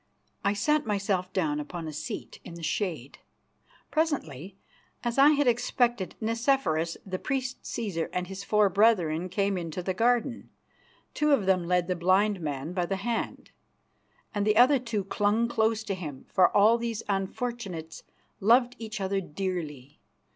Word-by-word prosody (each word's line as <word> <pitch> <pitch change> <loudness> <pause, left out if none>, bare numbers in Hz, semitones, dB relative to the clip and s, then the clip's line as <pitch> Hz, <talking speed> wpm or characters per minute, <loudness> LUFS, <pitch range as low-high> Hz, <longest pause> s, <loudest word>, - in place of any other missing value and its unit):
I 200 - +2
sat 300 +9 +1
myself 195 -3 -1
down 155 -6 0
upon 160 +2 -6
a 155 - -6
seat 155 +1 -6
in 170 - -9
the 170 - -9
shade. 155 - -3 0.7
Presently, 195 - -2 0.5
as 240 +2 -1
I 280 +2 +8
had 290 -1 +2
expected, 240 -3 +1
Nicephorus, 225 - 0
the 185 -2 -4
priest 260 -1 -3
Cæsar, 195 -8 -3
and 180 0 -2
his 195 +1 -7
four 210 0 +3
brethren 185 -5 +2
came 195 0 0
into 170 +1 -5
the 185 - -1
garden. 240 +4 0 0.6
Two 300 -1 +2
of 220 -9 +2
them 185 -2 +2
led 180 0 +2
the 180 - 0
blind 185 +3 +2
man 145 +1 -4
by 180 -1 -1
the 195 - -1
hand, 225 +4 -3 0.8
and 205 -2 0
the 210 +1 +2
other 260 +3 +6
two 230 -5 -2
clung 205 +4 +1
close 220 -1 +1
to 205 - -3
him, 155 -8 -7
for 185 - +5
all 220 +3 +5
these 230 -2 -3
unfortunates 195 -4 -3 0.4
loved 240 +4 +4
each 220 -1 -6
other 195 0 -1
dearly. 150 -6 -5
195 Hz, 155 wpm, -28 LUFS, 175-230 Hz, 0.8 s, I